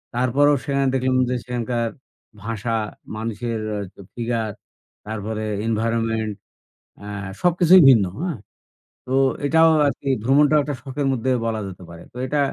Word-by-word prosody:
তারপরও 135 Hz, +4 st, +3 dB
সেখানে 140 Hz, -1 st, 0 dB
দেখলাম 130 Hz, 0 st, +1 dB
যে, 125 Hz, -, 0 dB
সেখানকার 120 Hz, -1 st, -2 dB, 0.5 s
ভাষা, 115 Hz, +1 st, -3 dB, 0.4 s
মানুষের 115 Hz, +1 st, -3 dB
অ্যা 105 Hz, -1 st, -2 dB
তো -, -, -13 dB
ফিগার, 115 Hz, -2 st, -2 dB, 0.5 s
তারপরে 110 Hz, 0 st, -4 dB, 0.2 s
environment 115 Hz, -1 st, 0 dB, 0.7 s
অ্যা -, -, -12 dB, 0.4 s
সবকিছুই 180 Hz, 0 st, +6 dB
ভিন্ন, 115 Hz, -7 st, +6 dB, 0.2 s
হ্যাঁ? 175 Hz, -7 st, -3 dB, 0.7 s
তো 125 Hz, -, -8 dB, 0.3 s
এটাও 160 Hz, +2 st, +5 dB, 0.2 s
আরকি 140 Hz, 0 st, -4 dB, 0.2 s
ভ্রমণটাও 145 Hz, +4 st, +4 dB
একটা 145 Hz, 0 st, -3 dB
শখের 135 Hz, +1 st, -3 dB
মধ্যে 130 Hz, 0 st, 0 dB
বলা 110 Hz, -1 st, -1 dB
যেতে 95 Hz, -1 st, -10 dB
পারে। 85 Hz, 0 st, -11 dB
তো 125 Hz, -, -11 dB
এটা 150 Hz, +3 st, 0 dB
120 Hz, 135 wpm, -22 LUFS, 110-140 Hz, 0.7 s, সবকিছুই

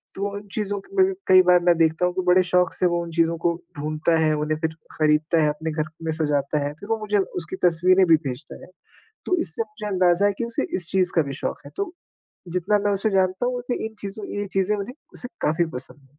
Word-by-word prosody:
तो 200 Hz, +1 st, -2 dB
उन 205 Hz, 0 st, -10 dB
चीज़ों 205 Hz, -2 st, -1 dB
के 395 Hz, -, -16 dB
लिए 375 Hz, -, +7 dB
भी -, -, -2 dB
कई 185 Hz, 0 st, +8 dB
बार 180 Hz, -, +7 dB
मैं 175 Hz, -1 st, +4 dB
देखता 160 Hz, +1 st, +2 dB
हूँ 180 Hz, -, 0 dB
कि 185 Hz, -, -1 dB
बड़े 185 Hz, +1 st, +5 dB
शौक 180 Hz, -1 st, +2 dB
से 185 Hz, -, 0 dB
वो 170 Hz, -, 0 dB
उन 170 Hz, -, -8 dB
चीज़ों 165 Hz, 0 st, +2 dB
को 170 Hz, 0 st, 0 dB, 0.2 s
ढूँढता 155 Hz, +2 st, 0 dB
है, 155 Hz, -1 st, +3 dB
उन्हें 155 Hz, +1 st, -1 dB
फिर 160 Hz, 0 st, -2 dB, 0.2 s
खरीदता 155 Hz, +1 st, +2 dB
है, 150 Hz, -, +3 dB
अपने 160 Hz, +2 st, -3 dB
घर 155 Hz, 0 st, -2 dB
में 160 Hz, -, -1 dB
सजाता 150 Hz, -2 st, 0 dB
है, 145 Hz, -, -3 dB
फिर 205 Hz, -, -11 dB
वो 225 Hz, -1 st, 0 dB
मुझे 210 Hz, -1 st, 0 dB
उसकी 180 Hz, -2 st, -4 dB
तस्वीरें 185 Hz, +3 st, +4 dB
भी 165 Hz, -, +7 dB
भेजता 135 Hz, +4 st, -7 dB
है। -, -, -13 dB, 0.6 s
तो 365 Hz, -, +1 dB
इससे 170 Hz, +6 st, -1 dB
मुझे 215 Hz, -1 st, -10 dB
अंदाज़ा 185 Hz, -1 st, +3 dB
है 205 Hz, -, +2 dB
कि -, -, 0 dB
उसे 235 Hz, 0 st, -2 dB
इस 175 Hz, -2 st, -2 dB
चीज़ 185 Hz, -1 st, +2 dB
का 165 Hz, -, +5 dB
भी 140 Hz, -, -5 dB
शौक -, -, -2 dB
है, -, -, -10 dB
तो 395 Hz, -3 st, -2 dB, 0.6 s
जितना 185 Hz, +4 st, +1 dB
मैं 205 Hz, -, +2 dB
उसे 200 Hz, +2 st, 0 dB
जानता 190 Hz, +3 st, +1 dB
हूँ, 250 Hz, 0 st, -1 dB
उसे 245 Hz, -1 st, -3 dB
इन 220 Hz, -, -9 dB
चीज़ों 200 Hz, +1 st, -6 dB
ये 205 Hz, -, -2 dB
चीज़ें 195 Hz, +2 st, +1 dB
उन्हें 205 Hz, +5 st, -5 dB, 0.2 s
उसे 245 Hz, -, -6 dB
काफ़ी 160 Hz, +3 st, +2 dB
पसंद 135 Hz, +2 st, -8 dB
हैं। 145 Hz, -, -33 dB
180 Hz, 250 wpm, -23 LUFS, 160-205 Hz, 0.6 s, कई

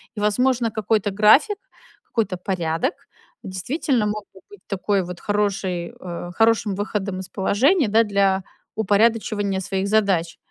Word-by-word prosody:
И, -, -, -5 dB
возможно, 235 Hz, +2 st, +1 dB
какой-то 210 Hz, -1 st, 0 dB
график, 215 Hz, -, +5 dB, 0.5 s
какой-то 225 Hz, -, -2 dB
порядок 180 Hz, -, -1 dB, 0.5 s
действительно 235 Hz, -, -1 dB
мог 210 Hz, 0 st, -3 dB
бы 190 Hz, -, -16 dB
быть 205 Hz, -, -14 dB
такой 195 Hz, 0 st, 0 dB
вот 180 Hz, 0 st, -8 dB
хороший 195 Hz, -4 st, -1 dB
э, 175 Hz, -1 st, -6 dB
хорошим 225 Hz, -3 st, +2 dB
выходом 200 Hz, -1 st, -3 dB
из 185 Hz, -, -10 dB
положения, 255 Hz, -, +2 dB
да, 225 Hz, +2 st, +5 dB
для 195 Hz, -2 st, +1 dB, 0.3 s
упорядочивания 210 Hz, -2 st, +1 dB
своих 190 Hz, +1 st, -2 dB
задач. 195 Hz, -6 st, +1 dB
205 Hz, 130 wpm, -22 LUFS, 190-220 Hz, 0.5 s, график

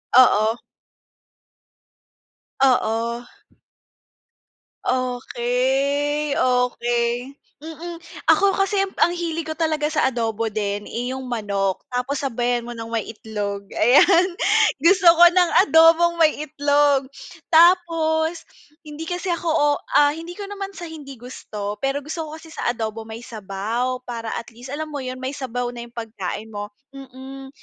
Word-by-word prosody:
Oo. 225 Hz, -3 st, +5 dB, 2.1 s
Oo. 235 Hz, -2 st, +1 dB, 1.6 s
Okey, 265 Hz, +4 st, 0 dB
okey. 245 Hz, 0 st, 0 dB, 0.2 s
Mm, 325 Hz, +3 st, -8 dB, 0.3 s
ako 400 Hz, -1 st, +5 dB
kasi, 390 Hz, +1 st, 0 dB, 0.2 s
ang -, -, +6 dB
hilig 330 Hz, -2 st, -3 dB
ko 315 Hz, -, -4 dB
talaga 310 Hz, -2 st, 0 dB
sa 310 Hz, -1 st, +1 dB
adobo 230 Hz, -3 st, -1 dB
din, 205 Hz, -1 st, -3 dB
eh, 245 Hz, +2 st, -4 dB
'yong 260 Hz, 0 st, -5 dB
manok, 200 Hz, -5 st, -2 dB
tapos 250 Hz, +3 st, -2 dB
sabayan 245 Hz, -2 st, -1 dB
mo 240 Hz, 0 st, -8 dB
ng 225 Hz, -, -6 dB
may 225 Hz, -, +1 dB
itlog, 205 Hz, -2 st, -5 dB
ayan. 340 Hz, -, +5 dB, 0.5 s
Gusto 345 Hz, +4 st, +5 dB
ko 345 Hz, -, +9 dB
ng 350 Hz, 0 st, +4 dB
adobong 330 Hz, 0 st, +5 dB
may 310 Hz, -1 st, +4 dB
itlog, 285 Hz, -2 st, +2 dB, 0.4 s
tapos 330 Hz, -1 st, +3 dB, 0.4 s
hindi 305 Hz, +2 st, -7 dB
kasi 355 Hz, 0 st, -2 dB
ako, 340 Hz, 0 st, -3 dB
o 310 Hz, -2 st, +3 dB, 0.3 s
ah, 290 Hz, 0 st, +5 dB
hindi 330 Hz, +3 st, -9 dB
ko 405 Hz, -, -5 dB
naman 395 Hz, -1 st, -6 dB
sa 350 Hz, -, -6 dB
hindi 295 Hz, -5 st, -10 dB
gusto, 210 Hz, -4 st, -7 dB
pero 275 Hz, +1 st, 0 dB
gusto 315 Hz, +1 st, -5 dB
ko 310 Hz, -, -8 dB
kasi 320 Hz, -1 st, -14 dB
sa -, -, -2 dB
adobo 225 Hz, -2 st, -3 dB
may 230 Hz, +2 st, -8 dB
sabaw. 230 Hz, +4 st, -3 dB
Para, 230 Hz, -2 st, -5 dB
at 230 Hz, 0 st, -8 dB
least, 245 Hz, +3 st, -11 dB
alam 305 Hz, +2 st, -5 dB
mo 285 Hz, -, -3 dB
yun, 255 Hz, 0 st, -5 dB
may 260 Hz, +1 st, -4 dB
sabaw 245 Hz, -3 st, -4 dB
na 240 Hz, -, -7 dB
yung 235 Hz, 0 st, -13 dB
pagkain 220 Hz, -1 st, -6 dB
mo, 205 Hz, 0 st, -5 dB, 0.2 s
mm. 270 Hz, 0 st, -10 dB
265 Hz, 135 wpm, -22 LUFS, 235-320 Hz, 2.1 s, ko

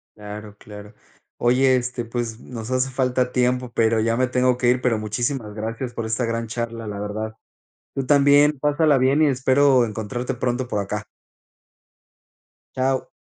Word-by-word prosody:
Claro, 105 Hz, 0 st, -9 dB
claro. 105 Hz, 0 st, -11 dB, 0.4 s
Oye, 130 Hz, +2 st, +3 dB
este, 125 Hz, -1 st, -2 dB
pues, 115 Hz, -1 st, -4 dB
nos 115 Hz, -3 st, -8 dB
hace 130 Hz, +1 st, 0 dB
falta 125 Hz, -1 st, 0 dB
tiempo, 125 Hz, 0 st, 0 dB
pero 115 Hz, 0 st, +2 dB
ya 115 Hz, +1 st, +1 dB
me 130 Hz, +1 st, +1 dB
tengo 125 Hz, 0 st, +2 dB
que 120 Hz, -, +3 dB
ir, 125 Hz, +1 st, +3 dB
pero 120 Hz, -3 st, +1 dB
muchísimas 110 Hz, +1 st, -3 dB
gracias 115 Hz, +3 st, -4 dB
por 115 Hz, -, -4 dB
esta 110 Hz, +3 st, -1 dB
gran 115 Hz, 0 st, -2 dB
charla, 115 Hz, 0 st, -5 dB
la 100 Hz, -1 st, -5 dB
verdad. 110 Hz, +2 st, -4 dB, 0.6 s
Tú 135 Hz, -, -2 dB
también, 145 Hz, +1 st, +5 dB
pásala 150 Hz, 0 st, +3 dB
bien 135 Hz, +4 st, +3 dB
y -, -, +5 dB
espero 130 Hz, 0 st, +3 dB
encontrarte 110 Hz, +3 st, -4 dB
pronto 125 Hz, +1 st, -1 dB
por 105 Hz, -4 st, -2 dB
acá. 100 Hz, +1 st, -4 dB, 1.7 s
Chao. 130 Hz, 0 st, 0 dB
120 Hz, 160 wpm, -22 LUFS, 110-130 Hz, 1.7 s, también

